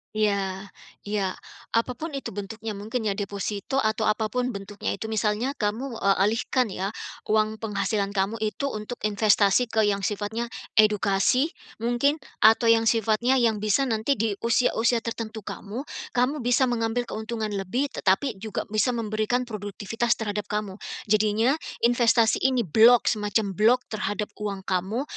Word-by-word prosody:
Iya 200 -2 0 0.3
iya. 200 -3 -2 0.4
Apa 230 +2 +2
pun 300 +4 -6
itu 275 - -5
bentuknya 215 +3 -6
mungkin 215 +4 -4
ya 210 - +1
deposito 200 +3 -4
atau 220 -2 +1
apa 215 0 0
pun 250 0 -1
bentuknya 200 +1 -4
itu 220 - -6
misalnya 220 +4 0
kamu, 225 +3 -2
eee, 195 0 +3
alihkan 225 +2 +1
ya, 190 +2 -3 0.4
uang 215 0 +1
penghasilan 200 -1 -1
kamu 200 +4 0
itu 220 +6 -2
untuk 215 +3 -5
investasi 210 +2 +3
ke 220 -1 +1
yang 205 -1 +1
sifatnya 210 +3 -3 0.3
edukasi 215 - +3 0.3
mungkin 245 +5 +2 0.2
atau 225 +1 +6
yang 225 0 +3
sifatnya 225 +3 +2
yang 230 -4 +2
bisa 215 +6 +2
nanti 235 +2 0
di 225 -2 0
usia-usia 230 0 +2
tertentu 225 -2 -5
kamu, 215 +7 -6 0.3
kamu 255 +5 +1
bisa 245 +1 +2
mengambil 230 +1 0
keuntungan 220 -1 -4
lebih 205 +8 -2
tetapi 195 +3 0
juga 215 0 -4
bisa 225 +3 +1
memberikan 220 +2 0
produktivitas 215 +1 -2
terhadap 210 -2 -3
kamu. 210 -2 -3 0.3
Jadinya 215 +3 +3 0.3
investasi 235 -1 +4
ini 255 -2 +1
block, 225 +7 +5
semacam 210 -1 0
block 225 +5 +4
terhadap 210 -1 -3
uang 200 -2 -4
kamu 190 +7 -1
220 Hz, 145 wpm, -25 LUFS, 205-235 Hz, 0.4 s, atau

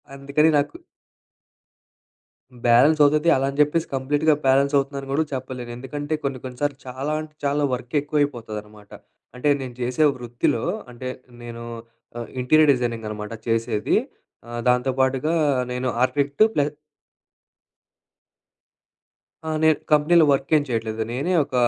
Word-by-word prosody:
అందుకని 140 +3 +2
నాకు 145 0 -1 1.9
బ్యాలెన్స్ 130 +7 +5
అవుతది. 150 +3 +3
అలా 135 0 +1
అని 140 - -7
చెప్పేసి 150 +3 +1
కంప్లీట్‌గా 145 +4 +2
బ్యాలెన్స్ 135 +2 +3
అవుతుందని 135 0 -2
గుడా 150 +3 +2
చెప్పలేను. 130 -2 -5
ఎందుకంటే, 145 +4 -5
కొన్ని 135 -2 -2
కొన్ని 125 -1 -8
సార్లు 145 -2 0
చాలా 130 +4 -4
అంటే 155 -1 -11
చాలా 145 +1 +1
వర్క్ 125 -1 -5
ఎక్కువ 150 +1 -1
అయిపోతుందనమాట. 105 -6 -5 0.4
అంటే 125 +4 -2
నేను 125 -2 -7
చేసే 125 +5 +1
వృత్తిలో, 120 -1 -1 0.3
అంటే 125 +1 -6 0.3
నేను 115 0 -8 0.6
ఆహ్, 120 - -7
ఇంటీరియర్ 155 +4 +4
డిజైనింగ్ 120 -3 -3
అనమాట 105 0 -6 0.2
చేసేది. 115 -2 0 0.5
ఆహ్, 120 0 -5
దాంతో 125 +1 +3
పాటుగా 130 +4 +1 0.4
నేను 125 +1 -2 0.2
ఆర్కిటెక్ట్ 140 +6 +2
ప్లస్ 145 0 +1 2.8
ఆ! - - -1
నేను 160 -1 +5 0.2
కంపెనీలో 155 +2 +5
వర్క్ 135 0 0
ఏం 150 - +3
చేయట్లేదు, 110 -2 -2
నేనే 140 +9 -1
ఒక 135 - -15
135 Hz, 130 wpm, -23 LUFS, 120-145 Hz, 2.8 s, బ్యాలెన్స్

